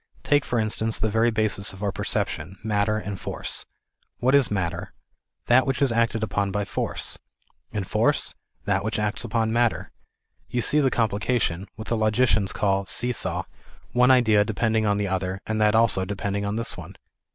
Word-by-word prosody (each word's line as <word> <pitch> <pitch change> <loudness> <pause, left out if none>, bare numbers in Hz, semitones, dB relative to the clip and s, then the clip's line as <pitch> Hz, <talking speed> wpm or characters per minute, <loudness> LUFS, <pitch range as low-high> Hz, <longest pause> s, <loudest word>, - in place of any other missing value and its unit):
Take 145 -1 +3
for 120 - -1
instance 110 0 0
the 110 0 -1
very 115 +2 +3
basis 110 -3 0
of 95 +2 -9
our 100 - 0
perception, 85 +2 -2
matter 105 0 +1
and 100 -2 -5
force. - - -4 0.5
What 130 +2 +2
is 140 -3 +5
matter? 90 -2 -3 0.5
That 130 +3 +4
which 135 - 0
is 140 -3 +3
acted 115 -1 +1
upon 100 -1 0
by 100 +1 -2
force. - - -3 0.5
And 100 -2 -3
force? - - +1 0.3
That 95 -1 +1
which 110 +1 -2
acts 105 +1 -1
upon 110 -1 0
matter. 120 -1 +1 0.6
You 120 -1 -1
see 150 - +3
the 135 -3 +3
complication, 105 -5 0
what 110 +1 -8
the 115 - +1
logicians 110 -2 +2
call 100 -1 0
see 125 +1 0
saw, - - 0 0.5
one 125 +1 +4
idea 110 -5 +5
depending 110 0 0
on 105 0 +2
the 105 -1 -1
other, 95 0 -2
and 110 0 -1
that 105 0 +4
also 110 -4 +4
depending 100 +1 -3
on 100 - -2
this 115 0 -2
one. - - -10
110 Hz, 180 wpm, -25 LUFS, 100-115 Hz, 0.6 s, is